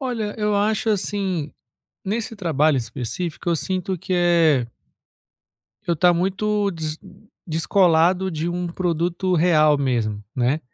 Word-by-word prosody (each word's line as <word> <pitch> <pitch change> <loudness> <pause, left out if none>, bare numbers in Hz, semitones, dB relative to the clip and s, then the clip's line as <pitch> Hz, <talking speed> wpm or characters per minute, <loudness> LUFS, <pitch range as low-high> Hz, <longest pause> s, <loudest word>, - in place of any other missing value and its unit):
Olha, 230 -6 -3
eu 210 -1 0
acho, 215 +2 +1
assim, 190 -6 -1 0.5
nesse 220 +3 -3
trabalho 155 -6 +1
específico 125 +9 -4
eu 170 - +2
sinto 185 +2 -2
que 185 +2 -4
é 165 -7 +3 1.2
eu 170 - 0
tá 175 +3 +4
muito 200 +3 0
des 160 -3 -4 0.5
descolado 180 +2 +2
de 160 0 -3
um 175 +1 -2
produto 175 +1 -1
real 155 -3 +4
mesmo, 115 -7 -1
né? 130 +5 +1
175 Hz, 125 wpm, -22 LUFS, 155-190 Hz, 1.2 s, tá